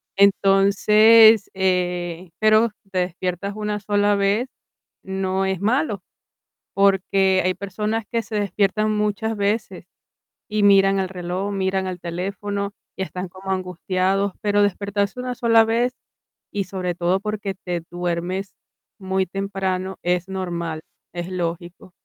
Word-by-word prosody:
Entonces, 200 +3 +6
eh 180 -2 -1
pero 215 +1 +4
si 195 - -31
te 185 - 0
despiertas 180 +2 -3
una 210 -1 -3
sola 205 0 +2
vez, 200 +5 +1 0.6
no 190 0 -1
es 190 -2 -1
malo, 215 - 0 0.7
porque 195 -1 +3
hay 185 - +2
personas 210 +3 -3
que 230 -1 0
se 220 - -6
despiertan 205 +2 +1
muchas 210 +1 -1
veces 205 +2 -2 0.7
y 210 -1 0
miran 195 -1 +5
el 190 -1 -1
reloj, 185 +2 -4
miran 190 -1 -1
el 180 -1 -5
teléfono 200 +4 -4 0.2
y - - -6
están 185 0 -5
como 190 +1 -7
angustiados, 185 +2 0
pero 205 -1 +2
despertarse 200 +2 -1
una 250 0 -3
sola 230 -1 +4
vez 235 +3 +1 0.6
y 200 -1 -1
sobre 180 -2 -3
todo 180 +2 +1
porque 210 -2 -3
te 180 -4 -4
duermes 175 +2 -3 0.5
muy 190 0 0
temprano, 190 0 -3
es 180 +1 0
normal, 170 -4 -4 0.3
es 175 0 -4
lógico. 175 0 -5
195 Hz, 130 wpm, -22 LUFS, 185-205 Hz, 0.7 s, Entonces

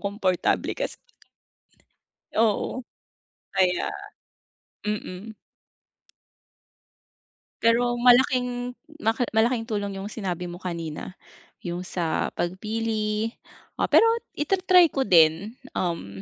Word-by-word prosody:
komportable 200 -3 0
kasi. - - -4 1.4
Oo. 225 +3 +1 0.7
Kaya 180 -1 +2 1.0
mm. 210 0 -4 2.3
Pero 240 +1 +3
malaking, 245 0 +3 0.2
ma 225 - +3 0.2
malaking 225 +1 +2
tulong 205 -3 -3
'yung 195 +2 -5
sinabi 180 -5 -3
mo 175 +1 -8
kanina, 170 0 -5 0.5
'yung 175 0 -3
sa 175 -3 -1
pagpili 215 +3 -1 0.5
o - - +1
pero - - +7 0.3
i-ta-try 365 0 +4
ko 270 - 0
din, 180 +2 +4 0.2
um, 100 - -3
210 Hz, 85 wpm, -25 LUFS, 180-240 Hz, 2.3 s, pero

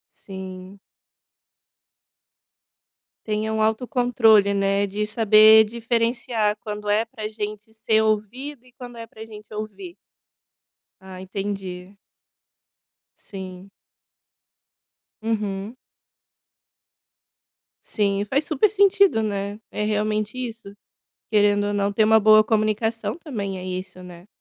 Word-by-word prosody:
Sim. 190 0 -10 2.5
Tenha 215 0 -2
um 220 - 0
autocontrole, 225 -3 +3
né, 200 0 +1
de 205 +2 -3
saber 215 0 +7
diferenciar 230 -1 -1
quando 210 -2 -6
é 215 +2 +2
para 225 -2 -8
gente 215 0 -7
ser 220 0 +1
ouvido 230 +6 -2
e 250 - -22
quando 245 -1 -11
é 230 0 -8
para 220 0 -11
gente 215 -1 -13
ouvir. 215 - -7 1.1
Ah, 190 -1 -11
entendi. 195 -1 -6 1.2
Sim. 190 -1 -10 1.5
Uhum. 210 -1 -3 2.1
Sim, 200 -2 0
faz 275 +8 -1
super 310 +7 +2
sentido, 400 - +4
né, 200 -1 -3
é 210 - -3
realmente 215 +1 -1
isso, 230 -5 -7 0.6
querendo 205 -1 +3
ou 205 - -1
não 200 0 0
ter 215 +2 +3
uma 220 +1 +5
boa 215 0 +6
comunicação 220 +4 -1
também 205 - -5
é 180 - -7
isso, 185 0 -6
né. 175 +1 -13
215 Hz, 105 wpm, -23 LUFS, 200-225 Hz, 2.5 s, saber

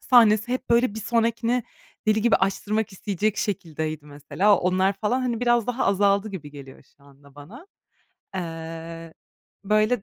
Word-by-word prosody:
sahnesi 230 -2 +4
hep, 255 - -4
böyle, 235 -2 +3
bir 220 - -5
sonrakini 230 +2 0 0.4
deli 215 0 +3
gibi 235 - +4
açtırmak 205 +2 -1
isteyecek 205 +2 -2
şekildeydi 155 -5 -3
mesela. 150 +7 +1
Onlar 185 +2 +2
falan, 210 +6 -1
hani, 240 -3 -2
biraz 240 -2 +2
daha 245 +1 -1
azaldı 200 +1 +2
gibi 160 -7 -8
geliyor 140 -2 -12
şu 140 - -25
anda 140 0 -20
bana. 205 - -12 0.7
Eee, 165 -1 -6 0.5
böyle, 215 +2 +2
200 Hz, 145 wpm, -24 LUFS, 165-230 Hz, 0.7 s, sahnesi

